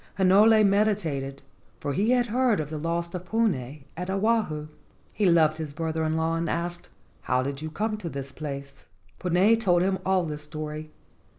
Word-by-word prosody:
Hinole 210 +3 +6
meditated, 185 -10 0 0.4
for 145 -1 -3
he 205 +8 +1
had 250 -1 +3
heard 240 -2 +2
of 150 -1 -4
the 155 - -4
loss 170 +2 -2
of 180 -1 -4
Puna 155 - 0
at 180 +2 -5
Oahu. 195 -7 0 0.5
He 205 -2 +1
loved 160 -3 +4
his 155 -3 -5
brother 160 +1 -2
in 155 0 0
law, 160 0 0
and 165 0 -1
asked, 175 +1 -3 0.3
"How 125 0 +1
did 140 +1 -4
you 155 - -4
come 215 +6 -2
to 180 -5 -5
this 140 -2 -6
place?" 140 -2 -7 0.3
Puna 185 +5 +4
told 180 -6 +3
him 190 0 0
all 190 -2 +2
the 150 -2 -4
story. 155 +1 -6
170 Hz, 180 wpm, -26 LUFS, 150-200 Hz, 0.5 s, Hinole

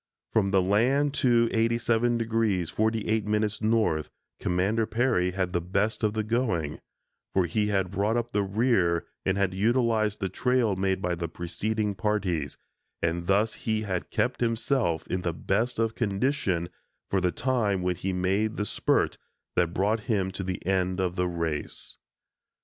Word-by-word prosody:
From 105 -3 +3
the 95 -1 +3
land 130 +9 +2
to 120 -2 +4
87° 115 +1 +2
48´ 110 0 0
north, 110 -8 +1 0.3
Commander 100 +5 +1
Peary 120 -6 +1
had 90 - -8
had 90 -2 -1
the 85 - +1
best 100 +6 -1
of 105 -1 +2
the 110 0 -1
going, 105 - -1 0.6
for 95 -2 +4
he 105 +5 0
had 95 -3 0
brought 105 +4 +1
up 120 0 -2
the 105 - +1
rear 100 -5 +1 0.2
and 95 +1 +2
had 100 -2 +1
utilized 110 0 +1
the 95 - -1
trail 120 +2 +1
made 95 0 0
by 90 0 0
the 85 0 -3
preceding 105 +6 -2
parties, 95 - -1 0.5
and 85 +1 -1
thus 105 +3 +3
he 110 -1 -2
had 95 -4 -3
kept 125 0 -1
himself 115 - +1
in 90 - -2
the 85 -2 -1
best 110 +9 -1
of 115 0 +1
condition 100 -5 0 0.4
for 95 - +2
the 90 -1 +2
time 110 -7 0
when 90 0 0
he 95 +2 -3
made 95 +4 0
the 105 - -1
spurt - - +1 0.4
that 85 -2 +2
brought 105 +5 +1
him 95 -4 +1
to 95 +1 -5
the 90 -2 -4
end 95 0 0
of 90 -1 0
the 90 0 +1
race. 85 -3 -4
100 Hz, 160 wpm, -27 LUFS, 90-115 Hz, 0.6 s, to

